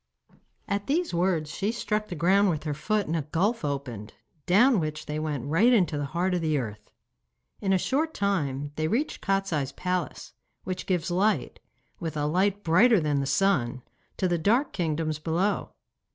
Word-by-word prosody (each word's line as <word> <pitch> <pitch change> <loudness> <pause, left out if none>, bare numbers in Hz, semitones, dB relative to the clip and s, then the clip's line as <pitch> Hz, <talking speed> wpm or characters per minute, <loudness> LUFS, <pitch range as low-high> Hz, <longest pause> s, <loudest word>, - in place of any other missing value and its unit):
At 200 0 -2
these 335 - 0
words 170 -3 0
she 205 +3 -1
struck 215 -2 -2
the 175 - -5
ground 190 +5 +3
with 155 -4 -2
her 150 -2 -2
foot 210 +7 0
and 160 - -2
a 160 - 0
gulf 180 - 0
opened, 135 -7 -4 0.3
down 215 +5 +5
which 155 -1 -4
they 150 +1 -3
went 150 -5 -3
right 175 - +4
into 185 -9 +3
the 145 -1 -2
heart 175 +6 -1
of 180 - 0
the 155 -2 +1
earth. 110 -5 -5 0.7
In 195 - -1
a 190 - +4
short 300 - -1
time 145 -8 -1
they 155 0 0
reached 250 - -1
Kostiei's 195 -9 0
palace, 180 -1 -3 0.3
which 185 0 -5
gives 180 -1 0
light, 200 +5 +1 0.4
with 160 -3 -4
a 145 - 0
light 190 +6 +1
brighter 210 +7 +5
than 150 -3 0
the 140 - -1
sun, 135 -7 +1 0.3
to 185 - +1
the 175 -1 0
dark 235 - +2
kingdoms 155 -3 -1
below. 175 +6 0
175 Hz, 180 wpm, -27 LUFS, 150-200 Hz, 0.7 s, down